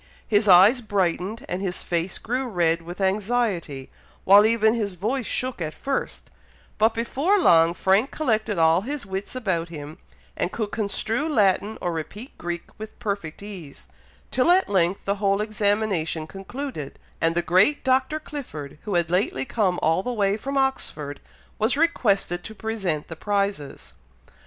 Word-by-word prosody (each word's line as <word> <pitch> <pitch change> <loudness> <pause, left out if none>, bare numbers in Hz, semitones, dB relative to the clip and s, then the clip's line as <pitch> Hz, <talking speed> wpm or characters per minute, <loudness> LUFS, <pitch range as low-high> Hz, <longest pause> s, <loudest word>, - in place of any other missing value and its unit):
His 210 0 +2
eyes 195 +7 +7
brightened, 200 0 -1
and 180 - -3
his 185 -2 -3
face 170 +1 -2
grew 250 +3 -2
red 170 -6 +1
with 175 +3 -9
anxiety, 195 - -1 0.3
while 205 +3 +7
even 220 -1 +3
his 210 -5 -2
voice 225 +7 -2
shook 255 -6 -2
at 155 -1 -3
first; 275 -1 -4 0.5
but 220 +1 +3
before 275 - +1
long 170 - +5
Frank 195 +9 +2
collected 220 - 0
all 165 +1 +4
his 275 +2 -5
wits 195 +4 -5
about 185 -9 -1
him, 155 +1 -9 0.4
and 180 - -1
could 215 -3 -3
construe 225 +6 -1
Latin 210 -4 +2
or 175 - -1
repeat 200 - -7
Greek 175 0 -4 0.2
with 220 0 -9
perfect 200 -4 -4
ease, 185 -9 -10 0.4
till 255 +6 +2
at 370 +2 +5
length 185 -1 +1
the 200 +1 0
whole 200 0 +2
examination 205 -7 0
concluded, 195 - -7 0.2
and 165 0 +2
the 175 - +1
great 190 - +3
Dr. 265 +4 +1
Clifford, 160 - -8
who 205 -4 -2
had 170 -1 +1
lately 175 -8 0
come 190 - 0
all 165 +3 +3
the 250 - -3
way 200 -4 +1
from 275 +6 -4
Oxford, 155 - -2 0.4
was 225 +5 +1
requested 200 - +1
to 220 - -8
present 195 -9 -3
the 165 - -7
prizes. 200 -5 -2
200 Hz, 155 wpm, -24 LUFS, 175-230 Hz, 0.5 s, eyes